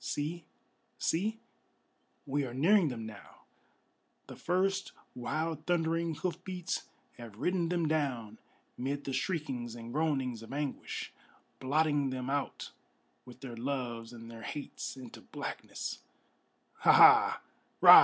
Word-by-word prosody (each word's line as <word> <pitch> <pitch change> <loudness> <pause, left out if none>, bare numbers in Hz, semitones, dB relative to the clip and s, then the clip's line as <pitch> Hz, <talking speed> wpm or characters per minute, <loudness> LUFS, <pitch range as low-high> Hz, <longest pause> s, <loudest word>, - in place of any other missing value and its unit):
See, 150 +7 -2 0.5
see, 210 +7 0 0.9
we 145 +1 0
are 125 -2 -5
nearing 175 +6 +5
them 115 -5 -4
now; 105 -2 -11 0.8
the - - -9
first 190 +2 0 0.2
wild 155 +5 -2
thundering 165 -1 +1
hoof 180 +3 -3
beats 180 -2 -3 0.3
Have 115 -3 -9
ridden 175 +4 +1
them 170 -2 +1
down, 130 -8 -1 0.4
'mid 140 +3 -2
the 135 - -3
shriekings 130 - -2
and 115 0 -8
groanings 135 -6 0
of 115 - -9
anguish, 145 -1 -3 0.5
Blotting 145 +1 +2
them 130 0 -3
out 140 -1 -2 0.6
with 125 +1 -12
their 125 -4 -6
loves 120 -2 -3
and 115 -1 -10
their 115 -1 -9
hates 140 +3 -5
into 125 -3 -10
blackness. - - -5 0.8
Ha! - - +6
Ha! - - +8
140 Hz, 125 wpm, -32 LUFS, 120-165 Hz, 0.9 s, Ha